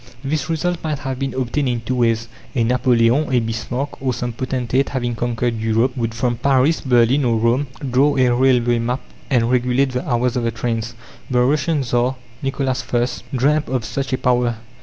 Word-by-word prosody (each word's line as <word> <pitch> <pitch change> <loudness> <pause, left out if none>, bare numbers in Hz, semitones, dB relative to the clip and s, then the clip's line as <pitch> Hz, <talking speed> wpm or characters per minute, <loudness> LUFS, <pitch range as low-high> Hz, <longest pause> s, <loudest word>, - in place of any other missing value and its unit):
This 145 +2 -2
result 175 +2 -1
might 155 -2 -1
have 135 -2 -5
been 135 -1 -3
obtained 130 +2 -1
in 120 -1 -1
two 115 +3 -3
ways. 115 -1 +1 0.3
A 120 - +2
Napoleon, 125 +3 +2
a 125 - +4
Bismarck, 120 +5 -4
or 130 -3 0
some 120 -1 -3
potentate 130 +2 -1
having 120 -3 -2
conquered 120 0 -1
Europe, 115 +3 +1
would 115 -3 -2
from 120 0 0
Paris, 140 +4 +2
Berlin, 125 +1 +3
or 115 -2 +2
Rome, 120 +5 +1 0.2
draw 135 +3 +3
a 125 -2 +4
railway 120 -2 +3
map 125 +3 -1 0.3
and 120 -3 +2
regulate 125 +2 +2
the 125 +2 -3
hours 120 0 +1
of 125 - 0
the 115 - +1
trains. 115 0 -3 0.3
The 125 -2 +2
Russian 145 +2 +1
Tsar 125 +1 0 0.3
Nicholas 135 -2 -1
I. 120 0 +3 0.3
dreamt 150 +4 +2
of 125 -4 -1
such 135 +5 -3
a 130 - +1
power. 125 -2 +1
125 Hz, 185 wpm, -20 LUFS, 120-135 Hz, 0.3 s, a